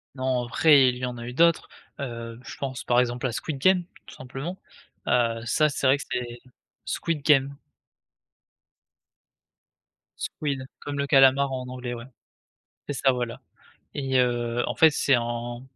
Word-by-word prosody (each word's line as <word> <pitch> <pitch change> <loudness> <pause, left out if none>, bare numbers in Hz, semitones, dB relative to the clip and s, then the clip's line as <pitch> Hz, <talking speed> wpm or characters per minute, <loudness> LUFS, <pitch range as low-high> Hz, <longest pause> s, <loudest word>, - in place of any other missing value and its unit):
Non, 130 - -6
en 125 -2 0
vrai, 140 +2 +5
il 125 - -3
y 125 - -3
en 125 -1 -5
a 120 0 -7
eu 125 - -6
d'autres, 170 +3 +3 0.3
heu, 115 -3 -6
je - - -9
pense 130 -3 -5
par 120 0 +3
exemple 125 +1 -2
à 120 - -4
Squid 150 +3 -4
Game, 180 +5 +3 0.2
tout - - -13
simplement, 135 +8 -7 0.5
heu, 115 -2 +2
ça 155 +6 +3
c'est 140 -2 -1
vrai 135 +2 +5
que - - -7
c'est 120 -1 -4 0.5
Squid 160 -3 -2
Game. 140 -1 +3 2.6
Squid 140 -3 -4
comme 145 -1 -6
le 140 - -1
calamar 135 0 +5
en 130 -1 -4
anglais, 125 -1 -5
ouais, 120 0 -8 0.8
c'est 145 - -2
ça, 135 0 +3
voilà 120 -2 -4 0.5
et 135 -2 0
heu, 120 -1 +1
en - - -3
fait 160 - +6
c'est 140 -2 +2
un 120 0 -2
130 Hz, 165 wpm, -25 LUFS, 120-140 Hz, 2.6 s, fait